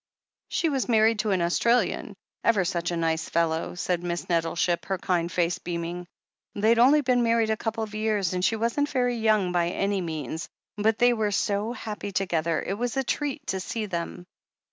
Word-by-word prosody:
"She 330 - 0
was 270 -4 -1
married 220 -1 +4
to 215 0 0
an 185 -3 +2
Australian. 235 +8 +1 0.3
Ever 210 -5 +3
such 175 -1 -1
a 170 - -2
nice 160 -1 -1
fellow," 165 0 0
said 175 -1 -1
Miss 175 -1 -3
Nettleship, 170 0 0
her 190 - -1
kind 175 -2 -1
face 175 -1 0
beam 170 -1 -4
ing. 175 +1 -6 0.5
"They'd 220 +3 +3
only 280 +5 +6
been 250 -2 +2
married 230 -1 +2
a - - +2
couple 225 0 -3
of 210 -1 -7
years, 215 -4 0
and 180 0 -1
she 225 - +3
wasn't 235 +6 0
very 245 -3 0
young 215 -5 +2
by 175 -1 +1
any 195 +2 -1
means, 160 -2 -4 0.3
but 215 +1 +1
they 245 0 +5
were 220 -3 0
so 205 +2 0
happy 210 -4 -5
together 170 -4 0
it 195 +3 -3
was 245 +1 -2
a 270 - +2
treat 285 +2 -2
to 190 - -1
see 215 +4 -3
them. 175 -1 -5
200 Hz, 195 wpm, -26 LUFS, 175-230 Hz, 0.5 s, only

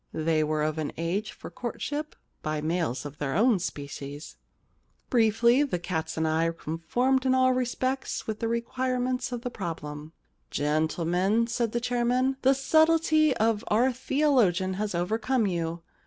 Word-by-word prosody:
They 155 0 +1
were 155 0 0
of 155 +1 -1
an 155 - -2
age 175 +6 -2
for - - -10
courtship 290 +5 -4
— - - -46
by 155 0 -2
males 155 -4 -1
of 145 0 -8
their 140 -1 -2
own 220 +1 +4
species. 145 -2 -6 0.8
Briefly, 235 +2 +4
the 275 -11 0
cats 160 -2 -3
and 160 0 +1
I 160 +1 +2
conformed 245 - 0
in 260 -1 +3
all 255 0 +4
respects 255 +1 -2
with 215 -1 -4
the 230 - -1
require 250 +2 -1
ments 250 +1 -1
of 245 -1 -4
the 245 - -3
problem.' 155 -6 -6 0.2
* - - -45
Gentlemen,* 170 +8 +1
said 230 -1 -1
the 240 - 0
chairman, 245 +2 +1
* - - -39
the 265 +1 +4
subtlety 315 0 +3
of 220 0 +1
our 245 +5 +3
theologian 245 - +2
has 205 0 -3
overcome 220 +7 0
you. 170 -2 -2
215 Hz, 165 wpm, -27 LUFS, 165-255 Hz, 0.8 s, own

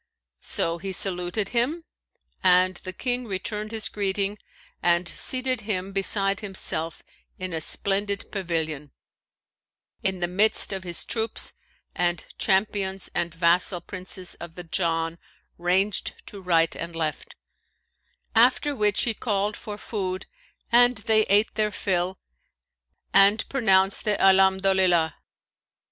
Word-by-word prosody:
So 165 +1 -1
he 195 +1 -5
saluted 185 +1 +1
him, 260 +8 0 0.6
and 185 0 +4
the 185 - -6
King 245 +5 -3
returned 210 +2 -4
his 220 -1 -1
greeting 200 0 -2 0.4
and 175 0 +2
seated 255 +4 -1
him 195 -3 -3
beside 195 0 +2
himself 185 -5 -2 0.3
in 185 -1 -5
a 160 - -2
splendid 200 +3 0
pavilion, 160 -7 -3 1.1
in 190 -1 -1
the 175 - 0
midst 200 +3 +3
of 190 -1 -5
his 175 -2 0
troops 225 0 +1 0.4
and 175 -1 -1
champions 195 -1 0
and 170 0 -1
vassal 175 +2 +2
Princes 185 +1 -6
of 170 -1 -9
the 180 - -7
Jann 165 -1 -1 0.4
ranged 190 +4 0
to 200 - -10
right 165 -3 +2
and 170 0 -6
left; 155 -2 -4 1.0
after 250 +5 +3
which 210 -4 +2
he 235 - +1
called 205 -2 -1
for 210 -3 -8
food 190 -4 -4 0.5
and 245 +1 +5
they 215 +1 +2
ate 205 +3 +3
their 215 0 +1
fill 185 -2 -1 1.0
and 200 +3 +5
pronounced 195 -7 +2
the 210 -2 +2
Alhamdolillah. 190 -3 +4
190 Hz, 125 wpm, -25 LUFS, 175-210 Hz, 1.1 s, and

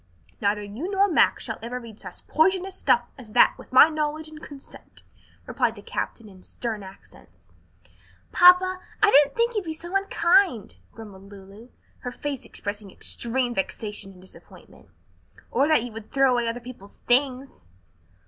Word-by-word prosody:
"Neither 205 +1 0
you 220 - -6
nor 400 0 +3
Max 350 - +2
shall - - -5
ever 240 +2 -5
read 230 -3 -12
such - - -10
poisonous 375 +3 +1
stuff 255 -8 +2 0.2
as 220 -4 -12
that 245 - +6
with - - -15
my 255 +4 +8
knowledge 310 0 -3
and 310 0 -12
consent," 280 -2 -13 0.4
replied - - -1
the - - -13
captain 230 - -5
in 190 -2 -16
stern 220 +1 -5
accents. 95 - -16 0.8
"Papa, 360 +1 +6 0.2
I 420 - +6
didn't 285 0 +5
think 470 +1 +1
you'd 420 -3 -2
be 320 -2 -5
so 345 +4 -8
unkind," 360 - +2
grumbled 200 -3 -12
Lulu, 200 +4 -14 0.3
her 245 - -6
face 275 0 -5
expressing 205 0 -6
extreme 240 +5 -3
vexation 205 0 -4
and 180 - -18
disappointment, 185 - -16 0.6
"or 275 +4 +2
that 310 -7 +3
you 245 - -7
would 220 -1 -10
throw 270 -1 +3
away 240 -1 0
other 230 +1 -3
people's 235 -5 -12
things." 260 - 0
250 Hz, 160 wpm, -24 LUFS, 210-315 Hz, 0.8 s, my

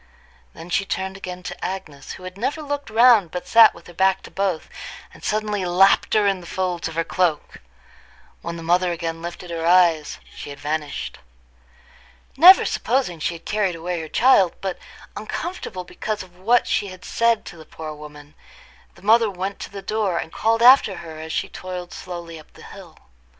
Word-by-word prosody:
Then 170 +2 -11
she 195 - +2
turned 190 0 -4
again 180 -2 -8
to - - -7
Agnes, 155 -7 -6
who 185 - -12
had 185 0 -8
never 275 +9 -3
looked 285 -2 -4
round 225 -4 +5
but 180 +2 -6
sat 230 -1 +7
with 170 - -15
her 175 - -13
back 190 +2 +2
to - - -12
both, 190 -4 -2 0.5
and - - -16
suddenly 210 -2 -1
lapped 185 +4 +3
her 210 -1 +4
in 195 -2 +1
the 170 - -12
folds 180 -1 -2
of 165 - -8
her 165 - +1
cloak. 165 -2 -1 0.8
When 170 0 -5
the 165 - -8
mother 175 +2 +2
again 165 -1 -4
lifted 175 +1 -7
her 165 -1 -4
eyes, 170 -3 +3 0.2
she - - -8
had 140 - -9
vanished. 150 0 -4 1.2
Never 355 +7 +8
supposing 245 -11 -1
she 170 +3 -2
had 165 - -13
carried 205 -4 0
away 170 +1 -4
her 160 - -8
child, 220 - +4
but 190 -2 -4 0.4
uncomfortable 215 - -5
because 210 +3 -5
of 180 -1 -18
what 225 +7 +2
she 205 - 0
had 185 -1 -11
said 230 -1 +1
to 175 - -10
the 160 - -11
poor 155 0 -8
woman, 150 0 -12 0.6
the 175 - -19
mother 225 +1 +4
went 195 +1 -5
to - - -7
the 195 0 -9
door, 205 -4 -1
and 160 - -5
called 225 +1 +1
after 250 -5 +7
her 160 -3 -9
as 160 0 -7
she - - -1
toiled 180 -1 -7
slowly 170 -2 -8
up 155 - -18
the - - -15
hill. - - -13
185 Hz, 190 wpm, -22 LUFS, 165-210 Hz, 1.2 s, Never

